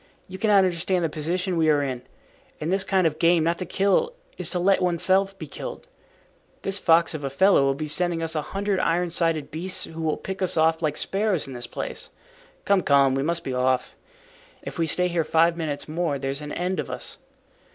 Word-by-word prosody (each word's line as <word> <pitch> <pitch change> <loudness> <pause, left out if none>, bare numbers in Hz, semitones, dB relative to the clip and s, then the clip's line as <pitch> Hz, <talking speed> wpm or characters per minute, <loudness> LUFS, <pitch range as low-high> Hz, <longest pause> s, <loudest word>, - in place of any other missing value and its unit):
You 190 0 -9
cannot 205 -3 +4
understand 180 0 0
the - - -1
position 175 +4 -2
we 160 -1 +3
are 145 -1 +3
in. 130 -3 -3 0.6
In 155 +3 -2
this 190 0 +3
kind 190 -2 +1
of 155 -2 0
game, 170 -1 +4
not 170 +1 0
to 185 - -4
kill 200 - +1 0.2
is - - -2
to 180 - -1
let 190 +2 +3
one's 175 -2 0
self 195 +1 +2
be - - -7
killed. - - -8 0.8
This 195 +1 -1
fox 165 -1 +4
of 155 -2 -5
a 135 - -2
fellow 140 +1 +4
will 135 0 +1
be 155 +2 -4
sending 170 +2 0
us 160 - -2
a 155 - 0
hundred 195 +4 -2
iron 175 0 0
sided 165 -3 0
beasts 185 +4 0
who 165 0 -7
will 155 -1 0
pick 190 0 -6
us 185 -2 0
off 160 +1 +3
like 155 -2 -1
sparrows 195 -4 0
in 135 - -8
this 120 -1 -5
place. - - -5 0.6
Come, 200 -2 +3
come, 140 -3 +4
we 135 - 0
must 170 +3 -1
be 130 - -4
off. 130 0 0 0.7
If - - -7
we 165 - +1
stay 180 +4 +2
here 170 -2 0
five 165 +2 +3
minutes 155 -4 -4
more 155 -2 -1
there's 135 +1 -3
an 150 0 -7
end 180 +2 -2
of - - -4
us." - - -5
170 Hz, 220 wpm, -24 LUFS, 155-185 Hz, 0.8 s, cannot